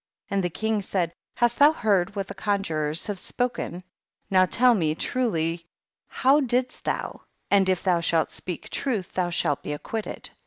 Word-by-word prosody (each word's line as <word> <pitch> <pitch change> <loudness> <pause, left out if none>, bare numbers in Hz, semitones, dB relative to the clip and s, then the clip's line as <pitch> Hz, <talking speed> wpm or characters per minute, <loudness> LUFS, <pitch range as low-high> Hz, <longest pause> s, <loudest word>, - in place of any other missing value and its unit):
12. - - -2
And 195 - +1
the 175 - 0
king 220 +4 -1
said, 180 -4 -1 0.2
hast 240 0 +2
thou 290 +2 +7
heard 200 - +1
what 195 -1 -2
the - - -8
conjurors 165 -7 -1
have 205 -2 -3
spo 245 +6 -2
ken? 180 +2 -5 0.5
Now 185 -1 +5
tell 250 +4 +5
me 160 -7 +1
truly, 165 -8 -1 0.4
how 275 +3 +3
didst 255 -2 -1
thou; - - -3 0.3
and 195 -2 +4
if 185 -1 +1
thou 180 -3 +3
shah 165 -1 +2
speak 180 -3 -7
truth 220 -10 -2
thou 180 -1 0
shalt 160 -4 0
be 150 - -4
acquitted. 215 +8 -5
195 Hz, 180 wpm, -25 LUFS, 170-225 Hz, 0.5 s, thou